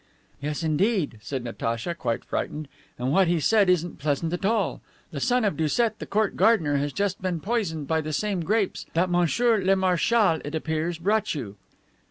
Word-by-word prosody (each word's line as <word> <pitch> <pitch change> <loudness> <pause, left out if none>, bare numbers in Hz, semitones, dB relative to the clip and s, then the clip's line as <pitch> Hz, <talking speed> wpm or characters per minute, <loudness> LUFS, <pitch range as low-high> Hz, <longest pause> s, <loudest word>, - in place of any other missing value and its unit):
"Yes, 150 +3 -3
indeed," 160 - +1
said 130 +2 -4
Natacha, 115 +5 -3
quite 120 -8 -3
frightened, 150 -1 -3 0.3
"and 125 +2 -1
what 190 +4 +4
he 170 -1 +2
said 205 +4 +3
isn't 175 -2 +1
pleasant 150 +3 -1
at 175 - -3
all. 225 +2 0 0.3
The - - -4
son 250 -2 +2
of 200 - +1
Doucet, 215 +9 0
the - - -6
court 215 0 0
gardener, 165 -11 +3
has 145 +1 -1
just 200 +1 -2
been 180 -3 -1
poisoned 175 -8 -2
by 160 -1 +1
the 155 0 -5
same 200 +4 -1
grapes 205 +3 -1
that 180 +2 +2
monsieur 210 +7 +3
le 195 +1 +4
marschal, 190 0 +2
it 145 +2 -5
appears, 160 +2 -2
brought 210 +3 0
you." 105 -9 -6
175 Hz, 185 wpm, -25 LUFS, 150-205 Hz, 0.3 s, what